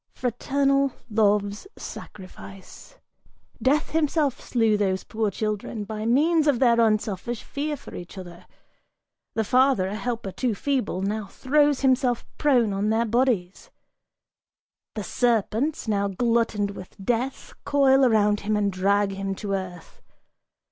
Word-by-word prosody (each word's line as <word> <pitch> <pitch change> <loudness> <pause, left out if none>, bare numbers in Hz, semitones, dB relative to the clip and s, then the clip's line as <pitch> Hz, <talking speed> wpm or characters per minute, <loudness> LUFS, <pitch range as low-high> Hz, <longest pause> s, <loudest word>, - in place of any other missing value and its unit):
Fraternal 275 +2 +1 0.2
love's 205 - +1
sacrifice! 195 - -11 0.6
Death 290 +4 +1
himself 300 -3 +1
slew 225 -3 +1
those 190 -2 0
poor 220 -1 -1
children 210 +1 -3
By 215 +1 -5
means 310 +6 +3
of 285 -4 +3
their 235 -2 +4
unselfish 215 +1 0
fear 295 +1 -3
for - - -13
each 175 +3 -9
other! 175 -2 -10 0.9
The 220 - +1
father, 255 -2 +3
A - - -5
helper 225 -2 -3
too 240 +2 -1
feeble, 230 -7 -1
now 210 +1 -2
throws 290 +5 +1
himself 255 -2 +2
prone 245 -8 +3
on 200 +2 0
their 225 +2 +2
bodies: 230 - 0 1.3
The 210 - -3
serpents, 240 +6 0
now 200 -2 +1
glutted 220 0 0
with 185 -2 -11
death, 240 +6 -2
coil 275 -1 +4
around 210 -4 +3
him 210 +1 -1
and 200 -2 0
drag 200 +2 +2
him 195 0 -3
To 200 0 -4
earth! 180 -3 -6
220 Hz, 130 wpm, -25 LUFS, 200-260 Hz, 1.3 s, their